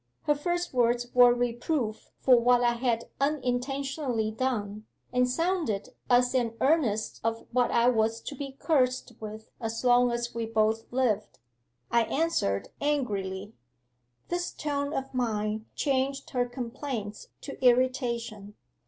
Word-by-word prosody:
Her 295 - +3
first 350 +4 -2
words 240 0 +1
were 245 -1 +8
reproof 240 0 -1
for 255 - +5
what 245 +1 +4
I 240 0 +3
had 235 -1 -1
unintentionally 270 -3 -1
done, 215 -3 -2 0.3
and 250 0 +3
sounded 320 - -1 0.2
as 245 0 +4
an 235 -3 0
earnest 260 -8 +1
of 225 0 -2
what 250 0 +2
I 235 +1 +3
was 225 -2 +2
to - - -6
be 275 0 -7
cursed 255 -5 +1
with 220 0 -8
as 225 +1 -3
long 245 0 +5
as 235 0 -2
we 230 -1 -3
both 220 0 0
lived. 240 -5 0 0.5
I 235 -1 +4
answered 280 - 0
angrily; 205 -9 -1 0.8
this 350 0 -1
tone 285 -1 -2
of 270 -3 -4
mine 220 -3 -1
changed 275 -1 -1
her 245 -1 +1
complaints 240 -3 -5
to 275 -2 -8
irritation. 240 -4 +1
245 Hz, 135 wpm, -28 LUFS, 225-270 Hz, 0.8 s, were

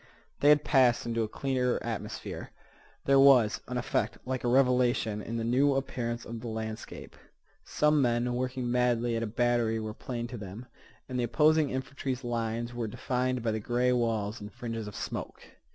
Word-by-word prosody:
They 145 - +5
had 150 0 +6
passed 130 -4 +3
into 115 -1 -1
a 110 - 0
clearer 125 +1 0
atmosphere. - - -5 0.6
There 135 0 +5
was 130 -6 +6
an 125 - -3
effect 125 +2 -1
like 130 0 -3
a - - 0
revelation 125 -4 +2
in 115 +2 -4
the 115 - -2
new 135 +4 +3
appearance 120 -3 -3
of 115 0 -6
the 120 - -7
landscape. 110 -1 -6 0.5
Some 150 0 +2
men 120 0 +1
working 125 0 -2
madly 120 -1 +1
at 115 - -1
a 115 - -1
battery 120 0 +1
were 110 -1 -4
plain 120 +1 -5
to 125 - -6
them, 105 +4 -8 0.4
and 125 -1 -3
the - - +1
opposing 150 +4 +3
infantry's 130 0 -4
lines 115 0 -2
were 120 -2 -3
defined 125 +2 -1
by 115 - +1
the 110 - -2
gray 125 +3 +1
walls 115 -2 -1
and 105 0 -8
fringes 115 +1 -5
of 105 - -8
smoke. - - -5
120 Hz, 180 wpm, -29 LUFS, 115-130 Hz, 0.6 s, had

